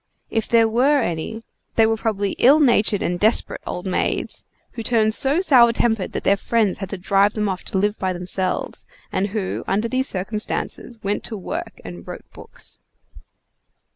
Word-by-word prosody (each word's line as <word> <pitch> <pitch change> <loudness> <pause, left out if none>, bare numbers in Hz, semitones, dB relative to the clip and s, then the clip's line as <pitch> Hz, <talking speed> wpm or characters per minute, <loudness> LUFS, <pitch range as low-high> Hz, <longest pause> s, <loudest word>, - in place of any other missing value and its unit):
If 225 -1 -1
there 230 -1 +4
were 260 +5 +3
any, 175 +7 -4 0.3
they 225 - +5
were 225 0 +2
probably 205 -3 -1
ill 280 +5 +6
natured 225 -7 +3
and 175 0 -1
desperate 220 +4 +1
old 180 - -5
maids, 185 - -2 0.3
who 235 - -6
turned 220 -1 +2
so 280 +8 +4
sour 250 -10 +6
tempered 225 -4 0
that - - -3
their 200 - +4
friends 215 -1 0
had 195 - -5
to 195 - -4
drive 195 +3 +2
them 210 -1 0
off 190 -2 -3
to - - -2
live 205 +2 0
by 185 - 0
themselves, 185 +1 -3 0.2
and 190 +2 0
who, 205 -2 -3
under 210 +4 0
these 260 +3 0
circumstances, 215 +4 -3
went 200 +1 -1
to 220 - -3
work 190 - -6
and 85 -1 -9
wrote - - -8
books. - - -4
215 Hz, 175 wpm, -21 LUFS, 190-230 Hz, 0.3 s, ill